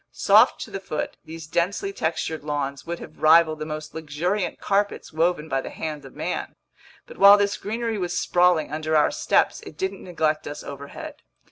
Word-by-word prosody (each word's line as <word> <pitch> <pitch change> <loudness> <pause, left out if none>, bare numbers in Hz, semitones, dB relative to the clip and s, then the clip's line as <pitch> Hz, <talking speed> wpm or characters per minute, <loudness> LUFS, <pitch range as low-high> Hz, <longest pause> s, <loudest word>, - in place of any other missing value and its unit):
Soft - - +5
to - - -7
the 195 - -4
foot, 155 -5 -4
these 160 0 -8
densely 185 - -1
textured 160 - -2
lawns 140 -1 -3
would 170 0 -3
have - - -12
rivaled 155 0 +5
the 155 - -4
most 155 -1 -6
luxuriant 160 +5 -2
carpets 200 -3 -1
woven 160 -1 +1
by 135 -3 -1
the - - -7
hand 150 -3 -6
of 135 - -13
man. - - -4 0.5
But - - -13
while 200 +1 +9
this 200 0 +1
greenery 225 0 -3
was 175 -1 -2
sprawling 175 -4 +2
under 155 0 -1
our 150 - +4
steps, - - +1
it 155 - -12
didn't 190 +2 -3
neglect 155 -4 -1
us 145 - -7
overhead. 140 0 -9
160 Hz, 180 wpm, -24 LUFS, 155-190 Hz, 0.5 s, while